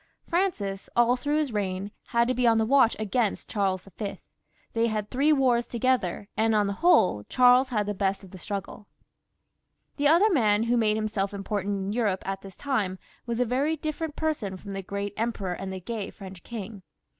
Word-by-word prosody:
Francis, 315 Hz, -, -1 dB
all 240 Hz, +1 st, +4 dB
through 290 Hz, +4 st, -1 dB
his 295 Hz, -6 st, -1 dB
reign, 195 Hz, -1 st, -2 dB, 0.2 s
had 235 Hz, 0 st, +2 dB
to 255 Hz, -, +1 dB
be 250 Hz, -1 st, +2 dB
on 225 Hz, -1 st, +5 dB
his 220 Hz, 0 st, +2 dB
watch 260 Hz, -3 st, +5 dB
against 215 Hz, 0 st, -1 dB
Charles 195 Hz, -2 st, -1 dB
V.; 205 Hz, -3 st, -3 dB, 0.6 s
they 230 Hz, 0 st, +2 dB
had 215 Hz, -2 st, -3 dB
three 280 Hz, +4 st, +3 dB
wars 255 Hz, -5 st, +3 dB
toge 255 Hz, +1 st, +2 dB
ther, 180 Hz, +2 st, -5 dB
and 225 Hz, 0 st, +2 dB
on 210 Hz, -1 st, +3 dB
the 200 Hz, -, -1 dB
whole, 220 Hz, -, +4 dB
Charles 250 Hz, +1 st, +5 dB
had 210 Hz, -4 st, 0 dB
the 205 Hz, -, -2 dB
best 195 Hz, 0 st, -1 dB
of 190 Hz, -, -13 dB
the 185 Hz, -, -10 dB
struggle. 200 Hz, +2 st, -6 dB, 1.1 s
The 290 Hz, 0 st, +3 dB
other 350 Hz, +8 st, +5 dB
man 215 Hz, -6 st, +3 dB
who 235 Hz, +1 st, +1 dB
made 215 Hz, -2 st, +2 dB
himself 205 Hz, -2 st, -2 dB
important 200 Hz, 0 st, -2 dB
in 195 Hz, +1 st, -3 dB
Europe 210 Hz, -5 st, 0 dB
at 195 Hz, 0 st, -3 dB
this 195 Hz, -2 st, -12 dB
time 215 Hz, -10 st, -1 dB, 0.3 s
was 235 Hz, 0 st, -2 dB
a 250 Hz, -, +3 dB
very 275 Hz, +7 st, +1 dB
different 310 Hz, 0 st, -4 dB
person 265 Hz, -12 st, -2 dB
from 200 Hz, +1 st, -8 dB
the 195 Hz, -, -3 dB
great 200 Hz, +1 st, -4 dB
emperor 220 Hz, -5 st, -2 dB
and 190 Hz, +2 st, -5 dB
the 190 Hz, -, -5 dB
gay 210 Hz, +2 st, -5 dB
French 190 Hz, -3 st, -11 dB
king. 215 Hz, -3 st, -7 dB
215 Hz, 200 wpm, -27 LUFS, 195-250 Hz, 1.1 s, on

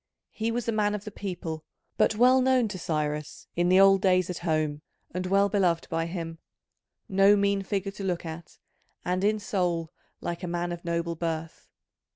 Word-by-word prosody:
He 225 Hz, +1 st, -2 dB
was 235 Hz, 0 st, -2 dB
a -, -, +2 dB
man 210 Hz, -1 st, +1 dB
of 210 Hz, -, -6 dB
the 210 Hz, -, -7 dB
people, 175 Hz, -6 st, -5 dB, 0.3 s
but 215 Hz, -, +3 dB
well 255 Hz, +3 st, +5 dB
known 255 Hz, -2 st, +3 dB
to 190 Hz, -2 st, -6 dB
Cyrus 150 Hz, -2 st, -3 dB
in 175 Hz, +1 st, +2 dB
the 185 Hz, +1 st, +6 dB
old 195 Hz, -1 st, +6 dB
days 185 Hz, -2 st, +3 dB
at 175 Hz, -, -5 dB
home 155 Hz, -3 st, -1 dB, 0.3 s
and 180 Hz, +1 st, -3 dB
well 200 Hz, +2 st, +4 dB
beloved 185 Hz, -5 st, +1 dB
by 165 Hz, 0 st, 0 dB
him: 165 Hz, -2 st, -5 dB, 0.7 s
no 195 Hz, +1 st, +5 dB
mean 200 Hz, 0 st, +2 dB
figure 195 Hz, 0 st, -2 dB
to 195 Hz, -, -8 dB
look 180 Hz, -3 st, -2 dB
at, 160 Hz, +1 st, -8 dB, 0.5 s
and 180 Hz, +1 st, 0 dB
in 215 Hz, +1 st, +3 dB
soul 175 Hz, -5 st, -1 dB, 0.3 s
like 170 Hz, 0 st, -4 dB
a 180 Hz, -, -4 dB
man 175 Hz, 0 st, -2 dB
of 175 Hz, 0 st, -6 dB
noble 170 Hz, 0 st, -1 dB
birth. 165 Hz, -1 st, -4 dB
180 Hz, 190 wpm, -27 LUFS, 170-200 Hz, 0.7 s, the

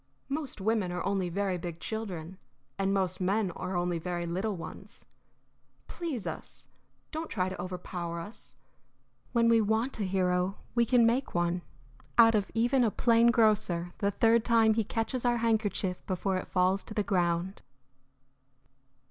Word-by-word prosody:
Most 280 Hz, -4 st, -4 dB
women 205 Hz, -2 st, 0 dB
are 180 Hz, -, -3 dB
only 195 Hz, -2 st, 0 dB
very 190 Hz, 0 st, -1 dB
big 170 Hz, -1 st, -6 dB
children, 190 Hz, -5 st, -5 dB, 0.4 s
and 195 Hz, 0 st, +1 dB
most 190 Hz, -2 st, 0 dB
men 195 Hz, +1 st, +1 dB
are 185 Hz, +2 st, -5 dB
only 175 Hz, -1 st, 0 dB
very 175 Hz, 0 st, -3 dB
little 190 Hz, +5 st, -2 dB
ones. 170 Hz, -, -10 dB, 0.8 s
Please 315 Hz, -, -4 dB
us; -, -, -7 dB, 0.4 s
don't 320 Hz, +1 st, -4 dB
try 185 Hz, -3 st, -1 dB
to 185 Hz, -, -6 dB
overpower 175 Hz, -2 st, -5 dB
us. 205 Hz, +7 st, -9 dB, 0.8 s
When 230 Hz, -1 st, +3 dB
we 230 Hz, -1 st, +5 dB
want 220 Hz, +4 st, 0 dB
a -, -, 0 dB
hero 185 Hz, 0 st, 0 dB, 0.2 s
we 235 Hz, -1 st, +2 dB
can 245 Hz, -1 st, +5 dB
make 240 Hz, 0 st, +1 dB
one 175 Hz, +1 st, +1 dB, 0.6 s
out 230 Hz, -1 st, +8 dB
of 205 Hz, -2 st, +1 dB
even 245 Hz, +3 st, +3 dB
a 230 Hz, -, +3 dB
plain 230 Hz, +2 st, +4 dB
grocer 200 Hz, -7 st, +2 dB
the 200 Hz, -, +2 dB
third 225 Hz, +3 st, +3 dB
time 225 Hz, -2 st, +4 dB
he 225 Hz, 0 st, +1 dB
catches 225 Hz, +4 st, -2 dB
our 240 Hz, -1 st, +2 dB
handkerchief 215 Hz, -5 st, 0 dB
before 185 Hz, +1 st, -1 dB
it -, -, -5 dB
falls 185 Hz, +1 st, +2 dB
to 215 Hz, -, -9 dB
the 210 Hz, -, +1 dB
ground." 180 Hz, -2 st, 0 dB
200 Hz, 155 wpm, -30 LUFS, 180-230 Hz, 0.8 s, out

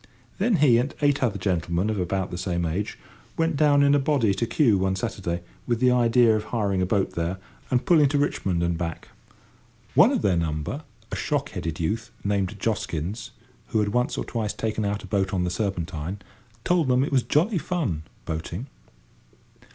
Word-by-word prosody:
Then 240 Hz, -, +3 dB
he 135 Hz, -7 st, +5 dB
and 135 Hz, +4 st, -2 dB
eight 145 Hz, -1 st, +3 dB
other 115 Hz, -6 st, +1 dB
gentlemen 90 Hz, -1 st, 0 dB
of 105 Hz, -, -2 dB
about 95 Hz, +1 st, -1 dB
the 90 Hz, -, -4 dB
same 85 Hz, -2 st, -1 dB
age 90 Hz, +6 st, -2 dB, 0.4 s
went 165 Hz, -1 st, +1 dB
down 145 Hz, -1 st, +4 dB
in 140 Hz, 0 st, +5 dB
a 145 Hz, -, +4 dB
body 135 Hz, -7 st, +2 dB
to 115 Hz, +4 st, -1 dB
Kew 115 Hz, -5 st, +3 dB
one 95 Hz, 0 st, +1 dB
Saturday, 95 Hz, -5 st, -3 dB, 0.3 s
with 120 Hz, -2 st, +1 dB
the 125 Hz, 0 st, +4 dB
idea 120 Hz, -2 st, +4 dB
of 110 Hz, 0 st, -2 dB
hiring 100 Hz, -5 st, 0 dB
a 90 Hz, -, +1 dB
boat 95 Hz, 0 st, +1 dB
there, 85 Hz, +2 st, -2 dB, 0.3 s
and 125 Hz, -2 st, +1 dB
pulling 155 Hz, -7 st, +5 dB
to 145 Hz, -, +1 dB
Richmond 95 Hz, -11 st, 0 dB
and 85 Hz, -1 st, 0 dB
back; 85 Hz, -2 st, -4 dB, 0.8 s
one -, -, +6 dB
of -, -, 0 dB
their 95 Hz, -3 st, +3 dB
number, 80 Hz, -, -2 dB, 0.3 s
a -, -, -2 dB
shock 145 Hz, -1 st, -1 dB
headed 80 Hz, -3 st, -4 dB
youth, 110 Hz, +8 st, -2 dB
named 100 Hz, 0 st, -1 dB
Joskins, 100 Hz, -2 st, -2 dB, 0.4 s
who 110 Hz, -, 0 dB
had 105 Hz, -1 st, +1 dB
once 125 Hz, +4 st, 0 dB
or -, -, -2 dB
twice 110 Hz, -3 st, -2 dB
taken 110 Hz, -1 st, -2 dB
out 100 Hz, +1 st, -2 dB
a -, -, -8 dB
boat 95 Hz, -1 st, 0 dB
on 90 Hz, -, +1 dB
the 90 Hz, -, -1 dB
Serpentine, 90 Hz, -2 st, -3 dB, 0.5 s
told 175 Hz, -5 st, +2 dB
them 125 Hz, 0 st, +3 dB
it -, -, -2 dB
was 135 Hz, -2 st, +4 dB
jolly 175 Hz, -, +1 dB
fun, 150 Hz, -, -2 dB, 0.2 s
boating! 80 Hz, +7 st, -4 dB
105 Hz, 190 wpm, -25 LUFS, 90-130 Hz, 0.8 s, one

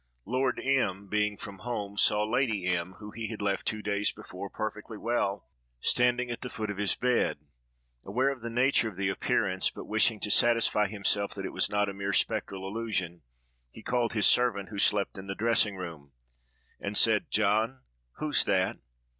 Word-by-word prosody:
Lord 130 Hz, +2 st, 0 dB
M—— 100 Hz, -8 st, 0 dB
being 105 Hz, 0 st, 0 dB
from 100 Hz, -1 st, -9 dB
home, 105 Hz, -4 st, -4 dB
saw 105 Hz, +1 st, +4 dB
Lady 110 Hz, -4 st, 0 dB
M——, 90 Hz, 0 st, -1 dB
whom 105 Hz, +1 st, -10 dB
he 115 Hz, -1 st, -4 dB
had 110 Hz, -1 st, -6 dB
left 100 Hz, -1 st, -1 dB
two 110 Hz, -1 st, -2 dB
days 105 Hz, 0 st, +1 dB
before, 100 Hz, -2 st, -9 dB
perfectly 110 Hz, +1 st, -5 dB
well, 105 Hz, -4 st, -1 dB, 0.3 s
standing 125 Hz, -, +2 dB
at 120 Hz, -, -5 dB
the 125 Hz, -, -5 dB
foot 110 Hz, -4 st, -4 dB
of 100 Hz, -, -7 dB
his 105 Hz, -1 st, +3 dB
bed; 125 Hz, -1 st, +1 dB, 0.7 s
aware 125 Hz, +7 st, +1 dB
of 135 Hz, -3 st, -7 dB
the 115 Hz, -, -4 dB
nature 120 Hz, 0 st, +2 dB
of 105 Hz, -, -13 dB
the 100 Hz, -1 st, 0 dB
appearance, 95 Hz, -2 st, +1 dB
but -, -, -9 dB
wishing 110 Hz, 0 st, +2 dB
to 105 Hz, -, +1 dB
satisfy 115 Hz, -3 st, +4 dB
himself 100 Hz, 0 st, 0 dB
that 95 Hz, -1 st, -5 dB
it -, -, -5 dB
was -, -, +2 dB
not 105 Hz, 0 st, +1 dB
a 100 Hz, -, -4 dB
mere 100 Hz, 0 st, -3 dB
spectral 95 Hz, 0 st, 0 dB
illusion, 95 Hz, -5 st, -3 dB, 0.5 s
he -, -, -13 dB
called 120 Hz, -1 st, 0 dB
his 105 Hz, -2 st, +2 dB
servant, 110 Hz, -6 st, +3 dB
who 105 Hz, -2 st, -6 dB
slept 100 Hz, -1 st, +2 dB
in 95 Hz, -, -9 dB
the 100 Hz, -, -4 dB
dressing 115 Hz, -2 st, +2 dB
room, 80 Hz, -7 st, -8 dB, 0.7 s
and 100 Hz, +1 st, -3 dB
said, 110 Hz, -2 st, +4 dB
"John, 110 Hz, +5 st, +1 dB, 0.3 s
who's 155 Hz, -1 st, +2 dB
that?" 95 Hz, +2 st, +1 dB
105 Hz, 185 wpm, -29 LUFS, 100-115 Hz, 0.7 s, saw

